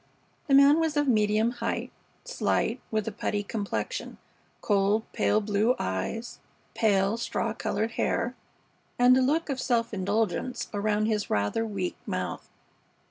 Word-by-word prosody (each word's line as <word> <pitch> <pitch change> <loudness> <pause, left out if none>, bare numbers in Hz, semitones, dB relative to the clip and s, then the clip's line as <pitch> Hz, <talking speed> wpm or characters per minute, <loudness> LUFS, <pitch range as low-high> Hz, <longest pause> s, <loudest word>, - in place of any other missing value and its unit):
The 275 - +4
man 280 +3 +7
was 320 -2 0
of 290 -1 +2
medium 215 -1 +3
height, 240 - -3 0.3
slight, - - 0
with 215 -1 -1
a - - -1
putty 205 0 -2
complexion; 205 -1 -4 0.4
cold, 205 +1 +2
pale 215 - +2
blue 210 +4 +2
eyes; 95 - -3 0.3
pale, 200 0 +2
straw 235 - -2
colored 225 +1 -2
hair, 235 +1 -1 0.6
and 245 +1 +6
a 260 - +3
look 300 +6 +1
of 270 -3 -2
self 235 -2 0
indulgence 205 +4 -1
around 210 +1 +1
his 215 -2 -1
rather 105 - 0
weak 195 -4 -3
mouth. - - -4
220 Hz, 135 wpm, -27 LUFS, 205-245 Hz, 0.6 s, man